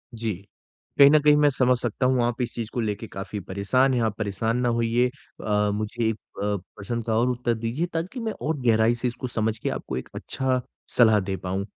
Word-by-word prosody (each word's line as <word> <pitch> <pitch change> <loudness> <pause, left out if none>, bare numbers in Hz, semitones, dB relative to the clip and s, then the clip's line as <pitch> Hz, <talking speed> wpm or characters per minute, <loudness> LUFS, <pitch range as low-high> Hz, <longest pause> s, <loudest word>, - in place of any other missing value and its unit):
जी। 110 -1 -2 0.6
कहीं 140 -1 +9
न 155 +1 +6
कहीं 150 0 +5
मैं 150 0 +5
समझ 125 -2 +2
सकता 120 +2 -1
हूँ, 130 -1 +3
आप 120 +1 -1
इस 120 -1 -2
चीज़ 115 -2 -4
को - - -2
लेके 110 0 -3
काफ़ी 100 +1 -6
परेशान 100 +8 +1
हैं। 125 - +1
आप 110 -2 0
परेशान 105 +2 -1
ना 120 - +2
होइए। 115 +1 +2
अ, 105 -5 -2
मुझे 110 +2 -1
अ, - - -5 0.3
प्रश्न 100 +3 -3
का 115 -1 -1
और 120 +2 +2
उत्तर 125 -1 0
दीजिए 115 +8 -2
ताकि 175 +10 -3
मैं 225 -2 -2
और 155 +1 -1
गहराई 115 -1 +4
से 120 +1 -2
इसको 125 +1 -4
समझ 110 -2 -1
के - - -2
आपको - - -4
एक 65 - -6
अच्छा 130 -1 -1 0.4
सलाह 110 -3 +6
दे 95 0 -3
पाऊँ। 95 +2 -3
115 Hz, 215 wpm, -25 LUFS, 105-125 Hz, 0.6 s, कहीं